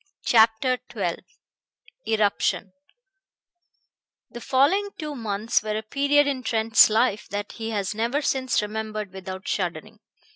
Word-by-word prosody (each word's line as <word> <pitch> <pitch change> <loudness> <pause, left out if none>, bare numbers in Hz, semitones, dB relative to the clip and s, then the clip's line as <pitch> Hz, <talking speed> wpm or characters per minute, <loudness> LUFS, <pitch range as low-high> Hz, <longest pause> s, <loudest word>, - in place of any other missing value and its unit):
CHAPTER 230 +3 +3
XII 190 -7 -2 0.9
ERUPTION 205 -3 0 1.6
The 240 - -9
following 305 - +2
two 300 -2 -5
months 220 -1 -1
were 215 0 -3
a 220 - -4
period 285 +5 +2
in 275 -2 -2
Trent's 225 -2 +4
life 215 -1 +1
that 205 +1 -4
he 225 -1 -6
has 205 -2 -2
never 230 +6 -1
since 260 -6 0
remembered 215 -2 -5
without 190 0 -8
shuddering. 170 -5 -3
220 Hz, 120 wpm, -24 LUFS, 205-255 Hz, 1.6 s, Trent's